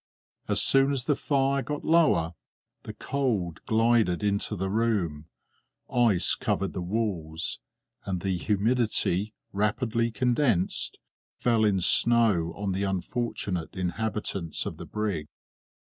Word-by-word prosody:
As - - +2
soon 135 +1 +4
as 135 -3 -1
the 145 - +2
fire 140 -1 +1
got 150 +2 -5
lower, 155 - +3 0.5
the - - -8
cold 110 - -2
glided 110 -5 +2
into 100 +1 0
the 95 0 -2
room; 95 -9 0 0.7
ice 115 -7 +4
covered 95 - -1
the 90 - -4
walls, 90 -5 -2 0.4
and 95 -3 -3
the 95 0 -1
humidity, 105 0 0 0.2
rapidly 115 +3 0
condensed, 115 -3 0 0.4
fell 115 -2 +1
in 100 -3 +3
snow 105 -5 +3
on 100 -1 -3
the 95 +1 -2
unfortunate 95 -2 -3
inhabitants 95 -2 -3
of - - -5
the - - -9
brig. 100 -8 -3
105 Hz, 120 wpm, -27 LUFS, 90-120 Hz, 0.7 s, soon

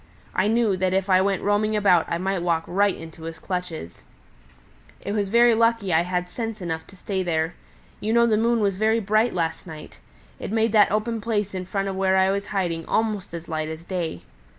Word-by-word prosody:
I 185 - +1
knew 225 -2 +2
that 185 0 0
if 195 0 0
I 185 0 +6
went 195 -1 0
roaming 210 +1 +1
about 190 -5 +3
I 170 - 0
might 190 +1 -1
walk 170 -2 +1
right 200 +2 +1
into 165 0 -11
his 165 0 -6
clutches. 170 - -5 1.0
"It - - -5
was 205 -2 -1
lucky 230 -4 +4
I 160 - +5
had 180 0 -2
sense 225 +3 -5
enough 160 -3 -4
to 195 - -15
stay 190 0 -3
there. 165 -2 -1 0.5
You 215 - -2
know 235 +1 +5
the 225 -2 +3
moon 230 +1 +2
was 200 -2 +1
very 220 +2 +2
bright 215 +2 +1
last 165 0 -2
night. 155 -2 -10 0.4
It - - -5
made 225 0 +2
that 210 -3 +5
open 220 +2 -1
place 210 -3 -1
in 185 -1 -5
front 195 +1 -2
of 195 - -3
where 190 0 +2
I 190 0 +4
was 200 +1 -2
hiding 175 -5 -2
almost 215 -3 -1
as 170 0 -8
light 155 -1 -3
as 160 +1 -8
day. 175 - -4
195 Hz, 210 wpm, -24 LUFS, 175-215 Hz, 1.0 s, I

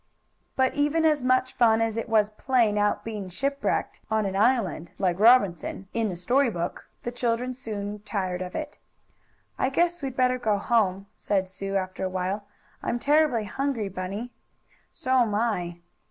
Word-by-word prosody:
But 260 0 +2
even 295 +3 +1
as 300 -4 +3
much 255 0 +2
fun 225 -2 +4
as 225 -1 0
it 230 0 -3
was 215 -1 +3
playing 220 -2 +2
at 205 0 +1
being 210 -4 -5
shipwrecked 275 +9 -2
on 220 -1 +1
an 190 -1 -2
island, 200 - +1
like 180 -2 0
Robinson, 200 -5 +4
in 230 -2 0
the 180 - -4
story 245 +10 +2
book, 175 -5 -4
the 240 - -3
children 245 +1 -1
soon 210 -4 -5
tired 185 -3 -3
of 180 0 -5
it. 305 -1 -5 0.8
"I 260 - +2
guess 345 +4 +1
we'd 265 -2 -4
better 255 0 +2
go 215 -4 +1
home," 200 -3 +1
said 190 -2 0
Sue 195 +1 -5
after 185 -1 -2
awhile. 185 +2 -2 0.3
"I'm 240 - -1
terribly 290 -3 +3
hungry, 240 -1 -2
Bunny." 195 +6 -5 0.6
"So'm 255 -8 +1
I." 180 -6 -1
220 Hz, 160 wpm, -26 LUFS, 195-255 Hz, 0.8 s, fun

